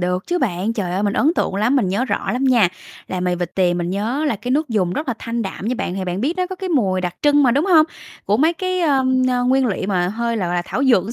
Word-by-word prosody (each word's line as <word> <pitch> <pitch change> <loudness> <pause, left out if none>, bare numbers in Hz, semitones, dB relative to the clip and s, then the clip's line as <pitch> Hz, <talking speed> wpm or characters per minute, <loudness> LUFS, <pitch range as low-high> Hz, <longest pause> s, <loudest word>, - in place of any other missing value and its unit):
được 180 +1 -1
chứ 355 - 0
bạn, 205 - -1
trời 200 -6 -3
ơi, 190 +2 -1
mình 205 -1 +1
ấn 290 +8 +2
tượng - - -1
lắm, 215 +7 +2
mình 225 -8 +1
nhớ 200 +7 0
rõ - - -2
lắm 255 +2 -1
nha. 240 -8 +4 0.4
Là 185 - -4
mì 180 0 0
vịt 175 -1 -4
tiềm 180 -2 +1
mình 175 0 -2
nhớ 225 +10 -1
là 290 -8 0
cái 245 +5 -6
nước 300 +3 +1
dùng 195 -6 0
rất 300 +9 -4
là 250 - 0
thanh 230 0 -3
đạm 195 0 -6
nha 245 - 0
bạn, 180 - -3
thì 190 -1 -3
bạn 180 +1 -3
biết 300 - -1
nó 365 0 0
có 375 0 -7
cái 375 0 -5
mùi 200 - +1
đặc 180 -1 -3
trưng 290 0 +4
mà, 255 - +4
đúng 280 +6 +2
hông? 320 -5 +5 0.4
Của 205 - +2
mấy 315 +7 +3
cái, 370 +1 -2
ờm, 265 -5 +2 0.3
nguyên 265 0 +3
liệu 195 -4 -2
mà 180 -3 +1
hơi, 235 +3 -2
gọi 185 -5 -1
là, 175 0 -1
thảo 265 - -2
dược 240 -8 +4
một 220 - -5
230 Hz, 295 wpm, -20 LUFS, 185-275 Hz, 0.4 s, hông